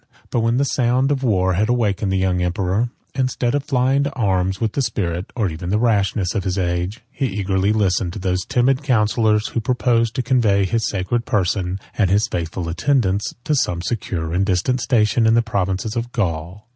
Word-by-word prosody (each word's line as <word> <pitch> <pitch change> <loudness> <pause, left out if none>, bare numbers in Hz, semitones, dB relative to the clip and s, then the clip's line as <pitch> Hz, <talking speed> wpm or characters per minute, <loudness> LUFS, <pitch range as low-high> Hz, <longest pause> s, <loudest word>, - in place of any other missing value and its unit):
But - - +1
when 115 +1 +1
the 140 - +2
sound 130 +1 +1
of 140 -2 0
war 95 -7 +2
had 105 +6 +1
awakened 105 -5 0
the 95 - +1
young 95 -1 +1
emperor, 95 +6 0 0.2
instead 130 -2 0
of 145 -1 -1
flying 135 +1 +2
to 140 - -3
arms 95 -5 0
with 110 -2 0
the 140 - -1
spirit, 90 -7 -2
or 110 -5 +1
even 85 +1 -5
the 105 - +2
rashness, 105 -5 +1
of 100 - -1
his 95 0 -2
age, 90 +4 -2
he 135 - -1
eagerly 95 -1 0
listened 95 -4 +1
to - - -7
those 90 -2 -1
timid 130 +1 +2
counsellors, 110 -4 +2
who - - -2
proposed 115 -1 +1
to 130 - -1
convey 110 -6 +2
his 110 +3 0
sacred 100 +5 -2
person, 95 -4 0 0.2
and 100 -4 +2
his 100 +3 +2
faithful 85 +1 -4
attendants, 100 - 0
to 155 - 0
some 90 -11 0
secure 85 -8 -3
and 95 +3 +1
distant 105 +7 +1
station 115 -1 +2
in 110 - +4
the 115 - +3
provinces 100 0 -2
of 120 +1 -3
Gaul. 90 - -3
105 Hz, 195 wpm, -20 LUFS, 95-120 Hz, 0.2 s, in